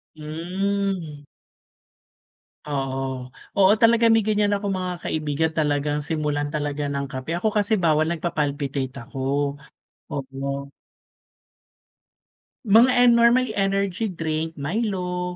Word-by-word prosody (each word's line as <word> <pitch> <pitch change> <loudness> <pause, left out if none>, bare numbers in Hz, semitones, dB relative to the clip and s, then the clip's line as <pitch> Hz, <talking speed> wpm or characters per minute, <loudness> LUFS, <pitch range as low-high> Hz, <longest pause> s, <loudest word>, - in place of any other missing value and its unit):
Hmm. 175 0 -3 1.4
Oo. 135 -2 -2 0.6
Oo, 190 +1 +7
talaga 230 0 +5
may 225 -2 +3
ganiyan 205 -1 +2
akong 200 0 -2
mga 180 -1 -3
kaibigan, 155 +1 -1
talagang 145 0 0
simulan 150 -1 -1
talaga 145 -1 -2
ng 140 0 -2
kape. 130 +4 -6
Ako 215 +5 +1
kasi 210 +2 +1
bawal, 155 -1 +3
nagpapalpitate 145 -5 -2
ako. 135 - -12 1.0
Oo. 135 -1 -5 2.3
Mga 230 +4 +6
e 245 - +6
normally 235 +1 +4
energy 195 +2 0
drink. 160 -2 -3
Milo, 180 +1 -2
165 Hz, 100 wpm, -23 LUFS, 145-200 Hz, 2.3 s, Oo